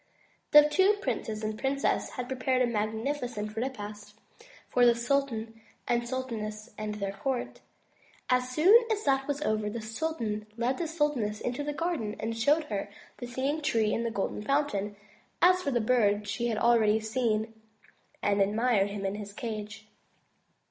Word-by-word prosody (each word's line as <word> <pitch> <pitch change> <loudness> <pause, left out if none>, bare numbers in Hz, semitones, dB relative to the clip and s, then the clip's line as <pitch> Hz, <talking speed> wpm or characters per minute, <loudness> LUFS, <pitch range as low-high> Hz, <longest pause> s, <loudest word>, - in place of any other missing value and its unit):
The 295 0 +8
two 380 +7 +4
princes 220 - -3
and 215 0 -1
the 215 - -11
princess 275 +1 0
had 250 -1 -5
prepared 255 0 +1
a - - +4
magnificent 220 0 -2
repast 210 -3 -6 0.5
for 245 - +2
the 240 -1 +6
sultan 235 -3 -1 0.3
and 240 0 0
sultaness 225 -4 -4
and 215 0 -4
their 200 -2 -3
court. 260 +3 -3 0.7
As 250 0 +2
soon 325 - +6 0.2
as 425 -1 0
that 270 -1 +1
was 290 +1 -2
over 215 -4 0
the 230 +3 -4
sultan 225 -2 -3
led 245 +3 0
the 340 - -1
sultaness 295 -10 0
into 245 +4 -3
the 295 - -2
garden 295 -10 -2
and 225 +1 -2
showed 290 +8 +3
her 205 -7 -4 0.3
the 245 - -5
Singing 270 +5 -1
Tree 225 -7 +1
and 230 - 0
the 230 - 0
Golden 205 -2 -3
Fountain. 210 -6 0 0.4
As 365 +1 +5
for 350 - -1
the 245 -3 +1
Bird 210 -3 +2
she 235 +3 -1
had 225 -2 -1
already 220 -2 +4
seen 220 -1 -1 0.7
and 200 0 +2
admired 210 0 +2
him 200 -1 -4
in 195 - -1
his 205 -1 -6
cage. 215 -1 -6
235 Hz, 165 wpm, -29 LUFS, 215-270 Hz, 0.7 s, The